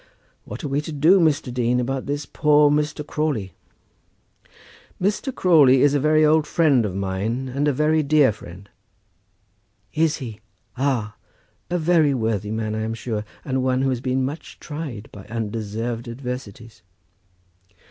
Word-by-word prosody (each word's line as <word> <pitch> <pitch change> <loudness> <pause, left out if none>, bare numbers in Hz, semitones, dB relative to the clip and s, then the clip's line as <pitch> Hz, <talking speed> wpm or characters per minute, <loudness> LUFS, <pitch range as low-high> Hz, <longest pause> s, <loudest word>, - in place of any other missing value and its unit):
What - - -8
are - - -2
we 140 +1 0
to 155 - -7
do, 160 +6 +4
Mr. 150 -6 +1
Dean, 125 0 +1
about 130 +1 -2
this 145 +1 -3
poor 150 -1 +3
Mr. 150 0 -1
Crawley?" 140 - -2 1.5
"Mr. 205 +8 -1
Crawley 150 - +5
is 145 -1 +4
a 145 - +2
very 155 +2 +4
old 155 0 +3
friend 140 -10 +3
of 95 - -6
mine, 100 +7 -2
and 140 +3 -1
a - - +4
very 150 +3 +2
dear 150 -3 +4
friend." 95 -1 -12 1.3
"Is 160 0 +1
he? 115 -7 -7 0.4
Ah! 125 -6 -1 0.5
A 180 - 0
very 160 -4 +3
worthy 110 -4 -1
man, 110 0 -2
I 110 - -2
am 110 +1 -3
sure, 110 -2 -4 0.2
and 130 -2 -1
one 130 0 +1
who 135 - +2
has 125 -2 -2
been 130 0 0
much 145 +5 -7
tried 145 -9 -7
by 100 -2 -11
undeserved 115 +1 -4
adversities." 120 -4 -7
130 Hz, 155 wpm, -22 LUFS, 115-150 Hz, 1.5 s, Crawley